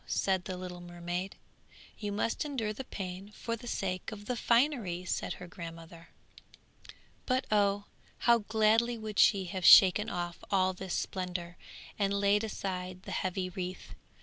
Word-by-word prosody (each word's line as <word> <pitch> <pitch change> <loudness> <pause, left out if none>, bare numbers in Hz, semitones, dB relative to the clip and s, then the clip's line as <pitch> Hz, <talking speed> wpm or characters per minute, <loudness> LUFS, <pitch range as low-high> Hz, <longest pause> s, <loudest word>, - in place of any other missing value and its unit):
said 190 -2 0
the 185 -1 -4
little 180 -1 -7
mermaid. 175 +2 -5 0.6
'You 210 -1 -3
must 210 +3 -1
endure 250 -8 -2
the 265 - -6
pain 190 -3 -6
for 230 - -3
the 240 +1 -11
sake 185 -4 -3
of 205 -1 -9
the 250 - -2
finery!' 235 - +1
said - - -2
her 180 - -9
grandmother. 165 -1 -10 1.2
But 255 0 +1
oh! 205 -1 +3 0.3
how 235 -1 +4
gladly 220 +2 +2
would 215 -2 -4
she 195 -3 +5
have 185 +1 -5
shaken 195 +3 +8
off 175 -1 -4
all 185 -1 +2
this 185 0 -4
splendour, 180 -2 -3 0.4
and 200 -1 +1
laid 200 +1 +3
aside 185 -3 -4
the - - -7
heavy 185 0 -2
wreath. 185 0 -6
195 Hz, 150 wpm, -31 LUFS, 180-215 Hz, 1.2 s, shaken